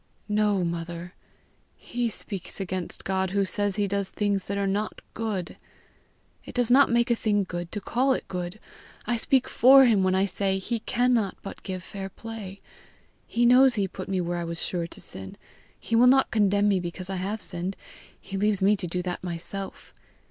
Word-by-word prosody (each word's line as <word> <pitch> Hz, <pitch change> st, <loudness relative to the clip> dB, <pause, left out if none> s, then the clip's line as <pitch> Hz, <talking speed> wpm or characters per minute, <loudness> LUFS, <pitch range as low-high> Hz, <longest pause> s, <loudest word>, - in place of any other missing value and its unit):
"No, 210 Hz, -2 st, +2 dB
mother. 170 Hz, +1 st, -4 dB, 0.6 s
He 240 Hz, -1 st, -2 dB
speaks 200 Hz, -3 st, -5 dB
against 185 Hz, -2 st, -4 dB
God 190 Hz, -1 st, 0 dB
who 200 Hz, +1 st, +1 dB
says 205 Hz, 0 st, -1 dB
he 205 Hz, -1 st, +1 dB
does 200 Hz, 0 st, -1 dB
things 200 Hz, -2 st, -1 dB
that 200 Hz, -, -3 dB
are 200 Hz, -, 0 dB
not 205 Hz, +2 st, -1 dB
good. 210 Hz, -6 st, -3 dB, 0.9 s
It -, -, -11 dB
does 245 Hz, -1 st, +1 dB
not 280 Hz, +3 st, +7 dB
make 235 Hz, 0 st, +2 dB
a -, -, +4 dB
thing 205 Hz, -3 st, +1 dB
good 175 Hz, -2 st, -5 dB
to 210 Hz, -, -3 dB
call 255 Hz, +6 st, +1 dB
it -, -, -4 dB
good. 180 Hz, +2 st, -5 dB, 0.5 s
I 240 Hz, -, +1 dB
speak 260 Hz, +3 st, +2 dB
FOR 270 Hz, +2 st, +7 dB
him 220 Hz, -5 st, +4 dB
when 185 Hz, 0 st, +2 dB
I 190 Hz, +1 st, +3 dB
say 195 Hz, 0 st, -1 dB
lie 235 Hz, -, +1 dB
cannot 245 Hz, -5 st, +2 dB
but 195 Hz, -, -8 dB
give 185 Hz, -2 st, -5 dB
fair 195 Hz, -1 st, -6 dB
play. 205 Hz, -2 st, -8 dB, 0.7 s
He 240 Hz, +1 st, +1 dB
knows 250 Hz, +1 st, +6 dB
he 200 Hz, -3 st, +1 dB
put 185 Hz, +1 st, -8 dB
rue 185 Hz, -2 st, 0 dB
where 175 Hz, 0 st, -2 dB
I -, -, -2 dB
was 170 Hz, 0 st, -4 dB
sure 170 Hz, -2 st, -2 dB
to -, -, -9 dB
sin; 95 Hz, 0 st, -7 dB, 0.4 s
he 230 Hz, -, -2 dB
will 240 Hz, +2 st, +6 dB
not 265 Hz, +1 st, +5 dB
condemn 205 Hz, -1 st, +3 dB
me 195 Hz, -2 st, +3 dB
because 180 Hz, +2 st, -5 dB
I 190 Hz, -, -2 dB
have 200 Hz, +4 st, -3 dB
sinned; 180 Hz, 0 st, -4 dB, 0.4 s
he 195 Hz, -, -6 dB
leaves 205 Hz, 0 st, +2 dB
me 200 Hz, +2 st, +4 dB
to 185 Hz, -, -4 dB
do 180 Hz, +1 st, -2 dB
that 180 Hz, 0 st, -4 dB
myself. 180 Hz, +3 st, -6 dB
195 Hz, 195 wpm, -26 LUFS, 185-220 Hz, 0.9 s, not